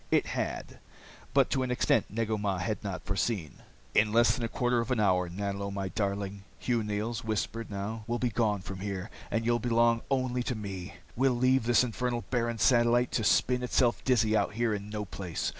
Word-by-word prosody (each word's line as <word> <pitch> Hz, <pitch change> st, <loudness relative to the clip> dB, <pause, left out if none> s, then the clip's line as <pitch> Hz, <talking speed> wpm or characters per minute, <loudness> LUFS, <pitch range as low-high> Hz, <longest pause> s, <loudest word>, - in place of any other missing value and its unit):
It -, -, +3 dB
had -, -, -4 dB, 0.5 s
but -, -, +3 dB
to 135 Hz, -, +1 dB
an 130 Hz, -, -1 dB
extent 125 Hz, -3 st, +2 dB
Negu 110 Hz, 0 st, -1 dB
Mah 100 Hz, -2 st, -1 dB
had 100 Hz, +5 st, -3 dB
not 95 Hz, -2 st, -4 dB
foreseen. 95 Hz, -, -2 dB, 0.4 s
"In 105 Hz, 0 st, +4 dB
less 115 Hz, +2 st, +5 dB
than 125 Hz, -, -4 dB
a -, -, +1 dB
quarter 120 Hz, +1 st, +1 dB
of 115 Hz, -, -2 dB
an 125 Hz, -3 st, +1 dB
hour, 90 Hz, -4 st, +2 dB
Nanlo 100 Hz, +2 st, -3 dB
my 100 Hz, -1 st, -3 dB
darling," 100 Hz, 0 st, -2 dB
Hugh 120 Hz, -2 st, 0 dB
Neils 105 Hz, +3 st, -2 dB
whispered 110 Hz, +1 st, -2 dB
now, 105 Hz, +2 st, -4 dB
"we'll 120 Hz, 0 st, 0 dB
be 120 Hz, -1 st, 0 dB
gone 105 Hz, -2 st, +1 dB
from 95 Hz, 0 st, -7 dB
here, 100 Hz, +1 st, -4 dB, 0.2 s
and 115 Hz, 0 st, -1 dB
you'll 120 Hz, 0 st, +2 dB
belong 115 Hz, 0 st, +3 dB
only 130 Hz, -2 st, 0 dB
to 125 Hz, 0 st, -2 dB
me. 100 Hz, -3 st, -6 dB, 0.2 s
We'll 130 Hz, +1 st, +3 dB
leave 130 Hz, 0 st, +3 dB
this 120 Hz, 0 st, +5 dB
infernal 125 Hz, 0 st, -2 dB
barren 120 Hz, -2 st, 0 dB
satellite 120 Hz, +3 st, +4 dB
to 110 Hz, -, 0 dB
spin 125 Hz, +4 st, +3 dB
itself 120 Hz, -6 st, +1 dB
dizzy 110 Hz, -4 st, +3 dB
out 105 Hz, -, +1 dB
here 115 Hz, 0 st, +1 dB
in 100 Hz, 0 st, -5 dB
no 105 Hz, -1 st, -3 dB
place. 95 Hz, -4 st, -3 dB
110 Hz, 200 wpm, -30 LUFS, 100-120 Hz, 0.5 s, less